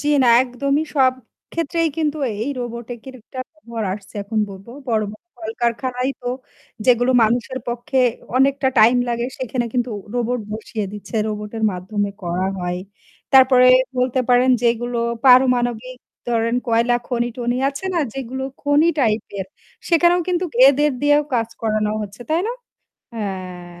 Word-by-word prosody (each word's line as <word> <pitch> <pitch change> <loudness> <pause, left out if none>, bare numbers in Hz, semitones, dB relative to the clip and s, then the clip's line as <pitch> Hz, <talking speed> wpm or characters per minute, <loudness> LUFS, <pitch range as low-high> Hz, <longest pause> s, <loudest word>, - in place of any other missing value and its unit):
জ্বি 295 - -2
না 250 - +4
একদমই 275 +4 -1
সব 260 -3 +4 0.4
ক্ষেত্রেই 330 0 0
কিন্তু 310 -1 -1 0.3
এই 280 - -2
রোবটের 240 +1 -7
একটা 255 +4 -8
খবর 235 -7 -6
আসছে 200 -1 -13
এখন 215 +2 -3
বলব 195 0 -11 0.2
বড়ো, 220 -2 +1
বড়ো 215 - -16 0.2
কলকারখানায় 245 +3 -1
হোক, 245 +1 -3 0.5
যেগুলো 245 0 +4
মানুষের 240 +3 0
পক্ষে 240 +2 -2 0.4
অনেকটা 270 +1 +3
টাইম 225 +3 +6
লাগে 235 0 -1
সেখানে 255 -1 -2
কিন্তু 245 -1 0 0.2
রোবট 245 0 0
বসিয়ে 215 -1 -4
দিচ্ছে 210 +2 -7
রোবটের 210 +1 -5
মাধ্যমে 200 +3 -3
করা 180 +2 -1
হয়। 180 0 -2 0.5
তারপরে 260 -1 +7 0.3
বলতে 255 +1 +1
পারেন 250 +1 +4
যেগুলো 240 0 0 0.3
পারমাণবিক, 250 -1 +4 0.3
ধরেন 230 0 +1
কয়লা 235 +1 +3
খনি-টনি 240 0 -1
আছে 275 +6 -6
না? - - +2 0.2
যেগুলো 265 0 -4 0.2
খনি 290 +3 +4
টাইপ 220 -5 +2 0.2
এর 190 - -3 0.4
সেখানেও 345 +1 +4
কিন্তু 360 0 0 0.2
এদের 295 +2 +3
দিয়েও 290 +1 +4
কাজ 230 -2 +1
করানো 215 -1 0
হচ্ছে। 205 +3 -9
তাই 320 +2 +2
না? 475 - -1 0.6
হ্যাঁ, 185 -4 -6
245 Hz, 140 wpm, -20 LUFS, 220-265 Hz, 0.6 s, তারপরে